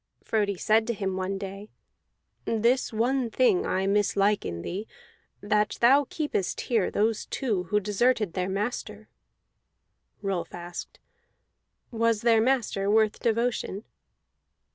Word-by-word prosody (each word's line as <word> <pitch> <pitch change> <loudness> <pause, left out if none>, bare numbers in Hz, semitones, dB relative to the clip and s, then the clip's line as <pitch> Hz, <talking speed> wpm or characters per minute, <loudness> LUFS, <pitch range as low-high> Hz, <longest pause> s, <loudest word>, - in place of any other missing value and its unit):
Frodi 205 -3 0
said 220 +4 +2
to 235 - -1
him 195 -2 -2
one 190 +1 -2
day: 195 +2 -7 0.8
"This 235 +3 +1
one 240 +3 0
thing 235 -6 +2
I 190 +1 0
mislike 205 0 +2
in 85 0 -5
thee, 200 +5 -5 0.5
that 210 0 +1
thou 270 +3 +5
keepest 295 - -2
here 225 -6 +1
those 215 +1 0
two 210 -9 -1
who 210 +5 +1
deserted 210 -1 +1
their 185 0 -2
master." 210 +6 -4 1.1
Rolf 195 -3 -3
asked: 175 0 -8 0.9
"Was 230 -2 +1
their 230 -2 +5
master 225 -5 +1
worth 215 0 +3
devotion?" 230 -3 -1
210 Hz, 120 wpm, -27 LUFS, 195-230 Hz, 1.1 s, thou